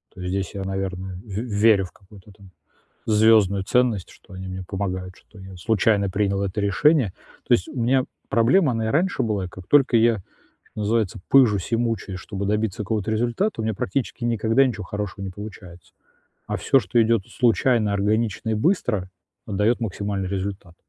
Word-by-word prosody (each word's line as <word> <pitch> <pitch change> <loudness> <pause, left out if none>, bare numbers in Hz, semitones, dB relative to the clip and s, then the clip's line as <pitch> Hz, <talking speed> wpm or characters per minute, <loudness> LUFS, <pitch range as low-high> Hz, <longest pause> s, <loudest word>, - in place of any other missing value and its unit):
То 95 - -10
есть 90 - -3
здесь 95 0 -3
я, 100 - -3
наверное, 95 -1 -4
в 95 - -14
верю 105 -1 +2
в 90 - -12
какую-то 100 0 -17
там 95 -1 -17 0.6
звёздную 105 -3 +4
ценность, 120 -4 +1
что 100 - -16
они 95 0 -7
мне 95 0 -5
помогают, 95 -2 -4
что 105 - -19
я 95 -1 -11
случайно 100 +1 +1
принял 100 0 0
это 100 +1 -2
решение. 110 - +2 0.3
То - - +6
есть 90 - 0
у 130 - -5
меня 130 +2 +2 0.2
проблема, 130 +6 +3
она 115 -1 -1
и - - 0
раньше 180 - +1
была: 105 -5 -1
как 95 0 -12
только 135 -4 +4
я, 115 0 +4 0.5
что - - -12
называется, 105 -2 0
пыжусь 110 -8 +4
и - - +5
мучаюсь, 115 -5 -2
чтобы 100 0 -5
добиться 105 -1 -1
какого-то 105 0 -2
результата, 120 - 0
у - - -3
меня 110 0 -1
практически 120 +6 -3
никогда 115 +2 +2
ничего 110 -5 -3
хорошего 105 -2 -5
не 95 - -5
получается. 90 -4 -11 0.5
А - - -2
всё, 135 - +3
что 120 -1 +1
идёт 115 -3 +2
случайно, 120 -3 +2
органично 105 +2 0
и - - +1
быстро, 110 - 0 0.4
э, - - -7
даёт 105 +5 +2
максимальный 100 -3 -3
результат. 95 -2 -5
105 Hz, 180 wpm, -23 LUFS, 95-115 Hz, 0.6 s, То